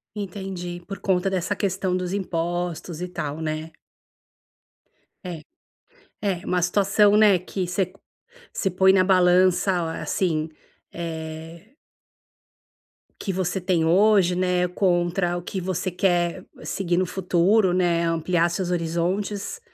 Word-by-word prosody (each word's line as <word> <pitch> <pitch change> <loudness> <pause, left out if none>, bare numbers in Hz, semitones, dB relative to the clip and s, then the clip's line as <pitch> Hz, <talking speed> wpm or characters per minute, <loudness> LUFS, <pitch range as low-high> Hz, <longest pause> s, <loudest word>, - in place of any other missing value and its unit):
Entendi, 185 -3 -6
por 195 -2 -7
conta 190 -1 +1
dessa 190 +2 -1
questão 190 -2 -1
dos 180 0 -2
impostos 175 -3 -3
e 180 - -3
tal, 150 -3 -5
né? 155 0 -4 1.5
É, 170 -4 -6 0.8
é 190 -3 -2
uma 180 -1 0
situação, 200 +3 +3
né, 210 -3 +6
que 185 0 -4
você 180 0 -1 0.6
você 195 - 0
põe 190 +1 +5
na 185 -1 +5
balança 185 0 +4
a 165 -2 -2
assim, 160 -4 -1 0.4
eh 165 +5 -7 1.5
Que 195 - -3
você 185 0 -2
tem 175 -3 +1
hoje, 190 0 +4
né. 180 -1 +1
Contra 175 -1 0
o - - -5
que 190 0 -4
você 185 0 -2
quer 175 -1 0 0.2
seguir 175 -3 -1
no 185 - +2
futuro, 185 +2 +2
né. 175 -2 +2
Ampliar 170 +1 +1
seus 180 +1 -2
horizontes. 180 - -2
180 Hz, 125 wpm, -24 LUFS, 170-190 Hz, 1.5 s, né